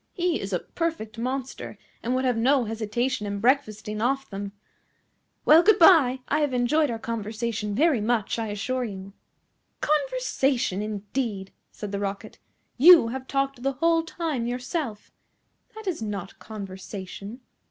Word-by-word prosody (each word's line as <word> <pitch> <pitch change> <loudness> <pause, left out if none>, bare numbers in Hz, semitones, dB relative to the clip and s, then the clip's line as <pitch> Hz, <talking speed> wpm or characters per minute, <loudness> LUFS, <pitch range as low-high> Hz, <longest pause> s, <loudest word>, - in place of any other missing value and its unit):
He 350 -2 0
is 195 - -5
a 180 - +2
perfect 240 - -4
monster, 260 +2 -4 0.2
and 245 +2 -1
would 260 +1 0
have 250 -2 +2
no 255 +3 +3
hesitation 220 +1 -2
in 200 0 -3
breakfasting 215 -4 0
off 270 +3 0
them. 200 0 -6 0.9
Well, 315 +2 +8
good 415 +2 +5
bye: 300 -8 +6
I 300 - +1
have 290 -4 0
enjoyed 290 +5 +2
our 230 - -2
conversation 220 -1 -3
very 290 -3 +3
much, 225 0 0
I 225 - -2
assure 235 +5 -2
you." 195 -3 -7 0.7
"Conversation, 290 - 0
indeed!" 210 -1 -3 0.2
said 210 -2 -7
the 200 - -2
Rocket. 200 0 -5 0.4
"You 320 -4 +8
have 260 +2 -6
talked 275 -2 -1
the 275 +2 0
whole 330 +4 +2
time 320 -7 -3
yourself. 250 - -4 0.6
That 440 0 -9
is 360 - -2
not 200 -4 -5
conversation." 200 +2 -8
240 Hz, 145 wpm, -26 LUFS, 210-280 Hz, 0.9 s, Well